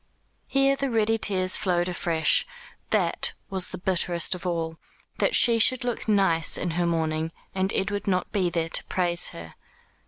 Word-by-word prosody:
Here 275 0 +2
the 275 0 -2
ready 225 -1 +1
tears 185 -3 +2
flowed 175 -2 0
afresh. 165 -3 +2 0.5
That - - 0 0.2
was 190 -2 +1
the - - -8
bitterest 175 -2 +1
of 180 0 -6
all. 165 -2 -3 0.4
That - - +2
she 230 -2 +5
should 255 +3 +3
look 245 -2 -4
nice 195 -6 +2
in 175 - -3
her 175 +1 -1
mourning, 160 -1 -1 0.2
and 190 +1 0
Edward 205 +1 -2
not 185 -2 -1
be 190 -4 0
there 165 -1 -2
to - - 0
praise 175 -2 +1
her. 80 -1 -10
180 Hz, 165 wpm, -25 LUFS, 170-205 Hz, 0.5 s, she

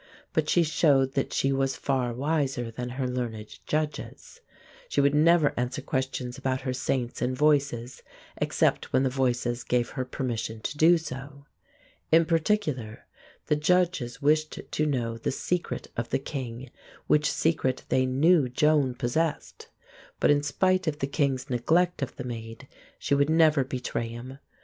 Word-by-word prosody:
But 155 -1 0
she 175 - +4
showed 145 -4 +3
that 135 - -1
she 135 - +1
was 135 0 0
far 130 -3 -1
wiser 135 -2 -1
than 125 +2 -5
her 130 -2 -1
learned 115 -4 -5
judges. 155 - -4 0.5
She - - 0
would 140 0 +4
never 155 0 +4
answer 125 +3 -2
questions 130 -2 -3
about 130 0 -1
her 130 -1 -2
Saints 125 -1 -2
and 125 +1 -1
Voices 140 -5 +1 0.4
except - - 0
when 130 +1 +4
the 130 - +1
Voices 120 -2 0
gave 120 -1 0
her 130 - -3
permission 120 -3 -4
to 145 - -4
do 165 +4 +5
so. 140 -2 -8 0.7
In 165 +1 +6
particular 155 - -1 0.4
the 150 - +2
judges 155 -5 0
wished 155 +1 +2
to 155 - 0
know 115 -5 -2
the - - -2
secret 175 +6 -3
of 115 0 -3
the - - +1
king, 130 -3 -6 0.3
which 150 0 +3
secret 140 -5 0
they 130 0 +2
knew 145 +2 +3
Joan 145 -1 +2
possessed. 145 +6 -2 0.5
But - - +4
in 145 0 +3
spite 185 +5 +1
of 150 -2 0
the 135 - -1
king's 140 -2 -1
neglect 160 +8 +1
of 135 - -3
the 130 - -6
Maid, 115 +1 -7 0.3
she - - -1
would 140 +1 +3
never 160 -3 +4
betray 125 -2 -3
him. 120 +4 -9
135 Hz, 160 wpm, -27 LUFS, 125-150 Hz, 0.7 s, In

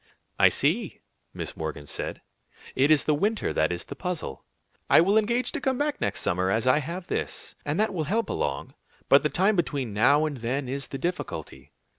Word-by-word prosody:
"I - - +7
see," - - 0 0.3
Miss - - -5
Morgan 80 -2 -5
said; - - -5 0.5
"it 135 +3 +3
is 155 -2 +5
the 155 - +2
winter 205 +8 0
that 80 +2 +2
is 85 - -2
the - - -8
puzzle. 180 - -4 0.5
I - - +7
will 190 +5 +4
engage 235 +3 +2
to - - -4
come 260 0 0
back 295 +1 -1
next - - -1
summer 90 +1 0
as 110 +4 +1
I 130 +3 +4
have 170 +5 -5
this, - - -4
and 150 +5 0
that 215 -1 +1
will 160 -4 -2
help 220 +8 0
along; 70 -1 -3 0.4
but 140 - +7
the 150 - +1
time 195 +6 +2
between 140 - -1
now 140 +9 +4
and 150 -3 -3
then 125 +4 -2
is 135 +1 -3
the 135 - -5
difficulty." 75 - -5
150 Hz, 200 wpm, -26 LUFS, 115-190 Hz, 0.5 s, I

